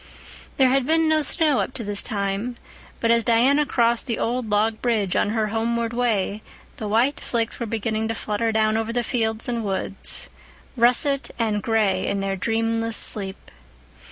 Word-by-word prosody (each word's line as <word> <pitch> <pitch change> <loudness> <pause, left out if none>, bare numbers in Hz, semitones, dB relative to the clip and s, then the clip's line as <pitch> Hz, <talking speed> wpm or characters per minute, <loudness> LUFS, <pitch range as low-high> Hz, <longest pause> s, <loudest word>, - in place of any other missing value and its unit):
There 265 -2 +5
had 265 0 +2
been 325 0 +3
no 315 0 +3
snow 305 -2 +2
up - - -2
to 235 - -4
this 205 -1 0
time, 200 +4 -2 0.4
but 230 - +2
as 235 0 +3
Diana 260 +6 +3
crossed 235 +1 +1
the 230 - -1
old 240 -1 -2
log 215 +1 +1
bridge 215 -6 0
on - - +2
her 215 -1 0
homeward 230 +1 -1
way 215 -4 0 0.4
the 215 - -4
white 235 +7 +2
flakes 230 -2 -2
were 235 - -3
beginning 220 0 -1
to 225 - -2
flutter 220 +2 -1
down 220 0 +2
over 225 0 -2
the 240 0 0
fields 225 -2 -1
and 235 -2 -2
woods, 195 -1 -3 0.4
russet 255 +3 +3
and 215 -3 0
gray 220 -3 +1
in 200 - -1
their 195 0 -1
dreamless 225 +2 -1
sleep. 195 -2 -3
225 Hz, 175 wpm, -23 LUFS, 215-240 Hz, 0.4 s, There